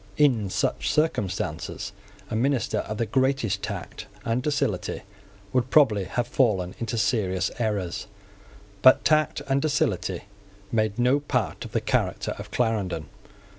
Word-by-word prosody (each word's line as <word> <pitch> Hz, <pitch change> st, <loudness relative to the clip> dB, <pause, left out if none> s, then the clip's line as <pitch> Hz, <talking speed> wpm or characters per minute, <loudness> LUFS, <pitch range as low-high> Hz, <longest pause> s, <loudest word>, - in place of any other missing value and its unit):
In 125 Hz, -9 st, +3 dB
such -, -, 0 dB
circumstances, 105 Hz, -, -1 dB, 0.4 s
a -, -, -1 dB
minister 120 Hz, -3 st, +1 dB
of 110 Hz, +1 st, -4 dB
the 115 Hz, -, 0 dB
greatest 130 Hz, -1 st, +1 dB
tact -, -, -6 dB, 0.2 s
and 115 Hz, +2 st, +1 dB
docility 125 Hz, -11 st, -1 dB, 0.5 s
would 125 Hz, 0 st, +1 dB
probably 110 Hz, -11 st, +4 dB
have 120 Hz, +7 st, -1 dB
fallen 100 Hz, -9 st, +1 dB
into 115 Hz, 0 st, -2 dB
serious 95 Hz, -7 st, +1 dB
errors. 105 Hz, -6 st, -2 dB, 0.7 s
But 130 Hz, +3 st, +7 dB
tact 155 Hz, -2 st, +2 dB
and 135 Hz, 0 st, +2 dB
docility 105 Hz, -, 0 dB, 0.5 s
made 110 Hz, -2 st, +1 dB
no 125 Hz, +4 st, +3 dB
part 130 Hz, -6 st, -2 dB
of -, -, -9 dB
the -, -, 0 dB
character -, -, 0 dB
of -, -, -7 dB
Clarendon. 100 Hz, -10 st, -1 dB
115 Hz, 130 wpm, -26 LUFS, 100-135 Hz, 0.7 s, But